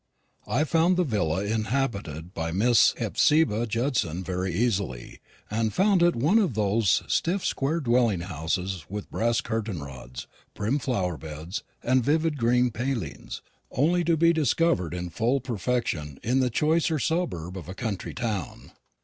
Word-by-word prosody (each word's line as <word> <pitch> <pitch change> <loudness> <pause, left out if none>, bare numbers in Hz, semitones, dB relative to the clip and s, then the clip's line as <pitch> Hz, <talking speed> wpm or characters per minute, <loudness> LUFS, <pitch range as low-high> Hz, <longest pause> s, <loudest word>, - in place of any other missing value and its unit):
I 140 - +1
found 165 +3 +2
the 180 - +3
villa 100 - 0
inhabited 105 - -2
by 80 -2 -3
Miss 115 +7 +4
Hephzibah 135 -7 +2
Judson 110 - -1
very 90 0 -2
easily, 95 - -2 0.3
and 110 0 0
found 195 -1 +3
it 175 0 +4
one 155 - +3
of 180 - 0
those 105 -1 +2
stiff 185 +3 0
square 145 +5 0
dwelling 120 - +2
houses 90 +1 -3
with 105 +1 -6
brass 115 +1 +1
curtain 110 -8 -3
rods, 65 -3 -9 0.3
prim 115 +8 0
flower 95 - -1
beds, 80 +6 -6 0.2
and 130 0 +3
vivid 155 +2 +1
green 125 +1 +3
palings, 120 - -4 0.3
only 170 +7 +2
to 165 0 +2
be 170 +2 +4
discovered 140 - +1
in 90 -1 -5
full 120 +8 +1
perfection 115 - -2
in 125 +4 +2
the 130 -1 +2
choicer 160 +5 +1
suburb 135 - -2
of 90 -2 -8
a 95 - -6
country 105 -3 -4
town. 105 - -4
115 Hz, 150 wpm, -26 LUFS, 90-140 Hz, 0.3 s, Miss